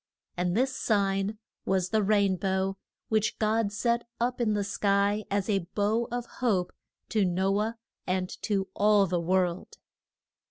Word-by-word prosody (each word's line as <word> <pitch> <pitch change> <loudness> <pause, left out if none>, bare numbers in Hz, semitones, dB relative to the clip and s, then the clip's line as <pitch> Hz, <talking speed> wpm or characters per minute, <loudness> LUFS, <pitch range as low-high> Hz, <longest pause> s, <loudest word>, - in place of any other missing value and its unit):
And 180 +2 0
this 260 +1 +1
sign 200 -1 0 0.3
was 185 -1 0
the 220 -1 +2
rain 200 -2 +3
bow, 190 +1 -1 0.3
which 215 -1 +1
God 215 -1 +1
set 235 +3 0 0.2
up 245 +1 0
in 215 -3 +2
the 205 - 0
sky 200 +1 +1
as 200 -1 0
a 195 -5 0
bow 220 +3 +1
of 245 0 -2
hope 200 -8 -1 0.4
to 215 -2 +2
No 190 +2 +1
ah 220 +2 -1 0.3
and 185 0 0
to 195 -3 0
all 205 -1 +4
the 175 -2 -1
world. 180 0 0
200 Hz, 155 wpm, -28 LUFS, 190-215 Hz, 0.4 s, all